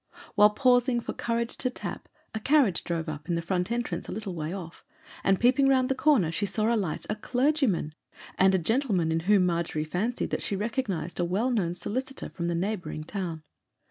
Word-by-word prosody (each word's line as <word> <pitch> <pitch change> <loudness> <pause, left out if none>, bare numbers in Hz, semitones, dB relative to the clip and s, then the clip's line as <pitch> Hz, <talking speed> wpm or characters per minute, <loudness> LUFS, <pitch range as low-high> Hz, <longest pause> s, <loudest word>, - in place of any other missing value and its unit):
While 210 0 +7
pausing 245 +1 +3
for - - -5
courage 235 0 -2
to 255 - 0
tap, 250 - -6 0.2
a 220 - -2
carriage 260 - +3
drove 170 -1 -2
up 150 -1 -5
to 175 - -1
the - - 0
front 180 +3 -1
entrance 235 -8 -2
a - - -4
little 200 -2 -4
way 160 -1 -4
off, 175 -3 -8 0.4
and 195 -1 +3
peeping 255 +3 +4
round 260 -1 +3
the - - +3
corner 260 - +3
she 205 +5 -1
saw 215 +4 +1
alight 195 -9 -1
a 210 - -1
clergyman, 245 - +1 0.4
and 190 0 +4
a - - +4
gentleman 190 - +1
in 160 - +1
whom 190 +2 +4
Margery 170 -3 -1
fancied 195 +10 -2
that - - -1
she 200 - -2
recognized 200 - -2
a - - +2
well 200 +9 0
known 180 -7 0
solicitor 260 +9 -4
from 170 -1 -4
the 170 - 0
neighbouring 185 -3 -3
town. 165 -3 -5
200 Hz, 200 wpm, -27 LUFS, 170-240 Hz, 0.4 s, While